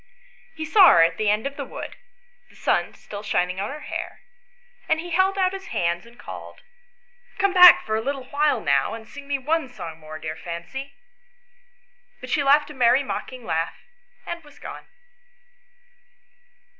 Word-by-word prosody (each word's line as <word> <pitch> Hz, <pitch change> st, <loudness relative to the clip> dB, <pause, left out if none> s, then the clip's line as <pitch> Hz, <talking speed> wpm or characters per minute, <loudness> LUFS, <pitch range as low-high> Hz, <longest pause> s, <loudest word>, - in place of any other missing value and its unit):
He 315 Hz, -, -4 dB
saw 375 Hz, +4 st, +7 dB
her 165 Hz, -, +7 dB
at 165 Hz, 0 st, +1 dB
the 215 Hz, -1 st, +1 dB
end 210 Hz, +3 st, +1 dB
of 280 Hz, 0 st, -4 dB
the 280 Hz, -, -3 dB
wood, -, -, -8 dB, 0.5 s
the -, -, -21 dB
sun -, -, 0 dB
still 205 Hz, -1 st, -9 dB
shining 185 Hz, -3 st, -1 dB
on 200 Hz, -, -2 dB
her 300 Hz, +2 st, -7 dB
hair, -, -, -6 dB, 0.7 s
and 315 Hz, -, +2 dB
he 345 Hz, +1 st, -7 dB
held 380 Hz, +3 st, +2 dB
out 375 Hz, -1 st, +2 dB
his 390 Hz, +1 st, -7 dB
hands 175 Hz, -, -1 dB
and 235 Hz, +1 st, -18 dB
called, -, -, -10 dB, 0.4 s
" 485 Hz, 0 st, -32 dB
Come 395 Hz, -1 st, +2 dB
back 360 Hz, -1 st, +9 dB
for 215 Hz, -, -1 dB
a 220 Hz, -, 0 dB
little 275 Hz, +2 st, -3 dB
while 295 Hz, +1 st, +2 dB
now, -, -, +1 dB
and 220 Hz, -1 st, -11 dB
sing 285 Hz, +2 st, -11 dB
me 285 Hz, -1 st, 0 dB
one 305 Hz, +1 st, -1 dB
song 165 Hz, -9 st, -8 dB
more, 155 Hz, 0 st, -9 dB
dear 155 Hz, 0 st, -5 dB
Fancy;" 180 Hz, +13 st, -7 dB, 1.2 s
but 255 Hz, -, -9 dB
she 300 Hz, -, +2 dB
laughed 290 Hz, +2 st, +4 dB
a -, -, -9 dB
merry 255 Hz, +1 st, +4 dB
mocking 255 Hz, -2 st, -6 dB
laugh, 165 Hz, -2 st, -1 dB, 0.5 s
and 345 Hz, -1 st, -6 dB
was 295 Hz, -1 st, -18 dB
gone. -, -, -9 dB
275 Hz, 180 wpm, -24 LUFS, 205-320 Hz, 1.2 s, back